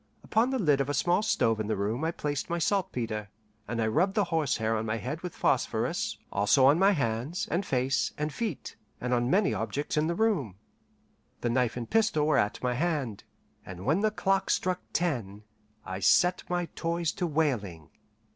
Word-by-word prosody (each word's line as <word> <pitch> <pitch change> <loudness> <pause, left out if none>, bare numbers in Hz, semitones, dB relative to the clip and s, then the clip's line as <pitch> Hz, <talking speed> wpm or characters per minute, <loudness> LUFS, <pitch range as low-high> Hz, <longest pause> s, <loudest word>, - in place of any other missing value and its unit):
Upon 225 +3 +2
the 265 - 0
lid 150 - +3
of 140 - -2
a 145 - 0
small 175 +8 +2
stove 115 - +1
in 110 - -2
the 110 - 0
room 105 +8 -2
I 160 - +1
placed 145 -4 -3
my 170 - 0
saltpetre, 120 - -1 0.4
and 115 +1 -3
I 115 - +2
rubbed 185 - +1
the 210 - +3
horsehair 115 -8 +1
on 110 - -1
my 110 0 -2
head 145 +8 -5
with 180 -2 -6
phosphorus, - - 0
also 105 +7 +4
on 145 +5 +5
my 195 +1 +6
hands, 130 - -2
and 175 +4 +1
face, 130 -4 0
and 150 0 -2
feet, 230 -3 -4 0.2
and 125 0 -1
on 120 0 +1
many 195 +5 +3
objects 145 +2 -3
in 155 +1 +2
the 170 - -1
room. 180 - 0 0.9
The 120 - 0
knife 125 -1 +1
and 120 -2 -4
pistol 215 -9 +2
were 155 - +3
at 105 - -1
my 125 -1 +1
hand, 135 - -2 0.4
and 90 0 -9
when 155 +8 +2
the 215 +1 +2
clock 195 -2 0
struck 180 0 0
ten, 115 - -2 0.4
I 95 0 -5
set 180 - +4
my 175 0 0
toys 170 -1 -1
to 180 - -2
wailing. 115 - -1
145 Hz, 195 wpm, -28 LUFS, 115-175 Hz, 0.9 s, my